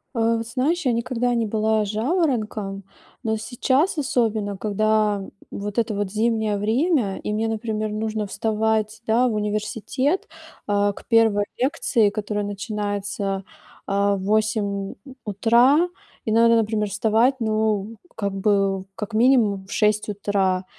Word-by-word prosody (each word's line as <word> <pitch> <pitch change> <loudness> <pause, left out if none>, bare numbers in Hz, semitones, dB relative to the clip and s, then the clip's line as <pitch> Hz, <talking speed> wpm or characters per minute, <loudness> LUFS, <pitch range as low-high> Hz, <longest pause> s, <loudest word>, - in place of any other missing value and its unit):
Э, 230 0 +2
знаешь, 275 +9 -1
я 255 - +3
никогда 245 +1 0
не 230 -1 +1
была 215 0 +1
жаворонком, 215 - -1 0.4
но 220 -2 0
сейчас, 265 - 0
особенно, 220 -7 0
когда, 215 0 +1 0.3
вот 205 +1 -5
это 230 -1 +1
вот 200 -2 -2
зимнее 220 -1 +1
время 225 - +1
и - - -4
мне, 220 +1 0
например, 215 -1 -2
нужно 215 0 -2
вставать, 220 +1 -1
да, 235 +3 +3
в 235 - -1
университет, 215 - -1 0.4
а, 205 0 +2
к - - -13
1 225 -3 +4
лекции, 255 -5 +2
которая 210 0 -3
начинается, 205 -1 -3 0.4
а, 200 0 +1
в 195 - -5
8 215 +1 +1 0.4
у 270 - -11
утра, 240 - +4 0.4
и 220 - -1
надо, 230 +1 +5
например, 215 -2 +1
вставать, 225 +6 +2
ну, 220 -1 0 0.2
как 200 -2 -2
бы, 195 -1 +1
как 210 +1 -6
минимум, 220 -5 +3
в - - -12
6 210 0 +1
утра. 195 -2 0
215 Hz, 135 wpm, -23 LUFS, 205-230 Hz, 0.4 s, надо